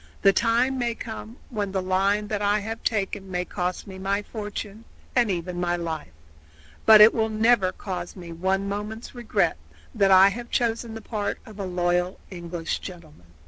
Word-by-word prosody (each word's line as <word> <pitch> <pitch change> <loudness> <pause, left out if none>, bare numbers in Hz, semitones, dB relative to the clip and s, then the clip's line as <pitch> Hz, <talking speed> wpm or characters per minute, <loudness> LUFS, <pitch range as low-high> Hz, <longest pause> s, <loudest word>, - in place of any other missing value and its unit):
"The 195 -1 +7
time 240 +5 +2
may 235 -1 0
come 225 +1 -7
when 205 -4 -2
the 190 - +1
line 195 +3 +1
that 210 -1 -1
I 205 0 +3
have 225 +2 -5
taken 195 -2 -1
may 180 -1 -2
cost 180 -1 -3
me 190 -2 -9
my 200 +2 -1
fortune, 210 0 -6 0.3
and 240 -3 +4
even 175 -1 -2
my 175 0 +1
life, 165 - -4 0.8
but 215 -1 +10
it 215 +2 +9
will 220 -1 +1
never 220 -3 +3
cause 180 -3 -6
me 175 -3 -9
one 190 +4 0
moment's 210 +3 -5
regret 240 -2 0 0.4
that 200 -4 +3
I 190 +1 +8
have 235 +4 -6
chosen 230 -1 -1
the 225 - -7
part 210 -1 -3
of 215 -2 -12
a 195 - -2
loyal 180 +1 0
English 170 -2 -4
gentleman." 160 - -11
200 Hz, 180 wpm, -25 LUFS, 180-220 Hz, 0.8 s, but